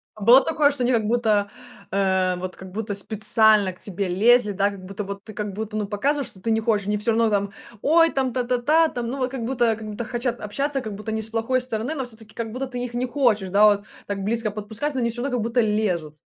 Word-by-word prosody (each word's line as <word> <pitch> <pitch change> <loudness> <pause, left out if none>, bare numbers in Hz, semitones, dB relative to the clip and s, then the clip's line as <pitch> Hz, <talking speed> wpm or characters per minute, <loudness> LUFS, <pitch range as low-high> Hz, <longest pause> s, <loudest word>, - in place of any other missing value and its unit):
А 215 - -14
было 250 +5 +8
такое, 305 -2 +3
что 265 -3 -2
они 250 - +2
как 225 -3 +1
будто, 215 -3 +1 0.4
э, 190 -2 +1
вот 185 0 -5
как 190 -1 -11
будто 210 0 -4
специально 215 -1 +3
к 180 - -18
тебе 200 -1 -3
лезли, 215 +4 +4
да. 200 +1 +1
Как 190 -2 -10
будто 195 +2 -6
вот 200 0 -7
ты, 215 - -10
как 210 -2 -4
будто, 215 +1 -4
ну, 210 - -1
показываешь, 275 +7 -1
что 190 - -14
ты 230 - -3
не 220 - +2
хочешь, 215 -3 0
они 210 0 +1
всё 225 +3 +1
равно 225 0 +2
там: 200 -1 0 0.3
"Ой, 330 +2 +5
там 260 -2 -1
та-та-та 255 +6 +2
там". 240 -5 -4
Ну, 265 +3 -4
вот, 255 0 0
как 255 -4 -4
будто 240 -2 +1
как 220 0 -9
будто 215 +2 -5
хотят 240 0 -2
общаться. 275 +6 -2
Как 215 -3 -6
будто 215 +2 -6
не 220 0 -2
с 220 - +2
плохой 230 +3 0
стороны, 245 +3 -3
но 270 -4 -3
всё-таки 220 -2 -11
как 225 -1 -5
будто 260 +3 -3
ты 245 -1 -5
их 240 -1 -6
не 250 +1 0
хочешь, 235 -8 +1
да, 205 +3 +5
вот 205 -1 +4 0.2
так 200 -1 -3
близко 225 +1 0
подпускать, 220 +8 -4
но - - 0
они 235 - +1
всё 240 +1 -5
равно 255 -2 -1
как 220 - -1
будто 235 +1 +1
лезут. 185 -8 -1
220 Hz, 255 wpm, -23 LUFS, 205-245 Hz, 0.4 s, было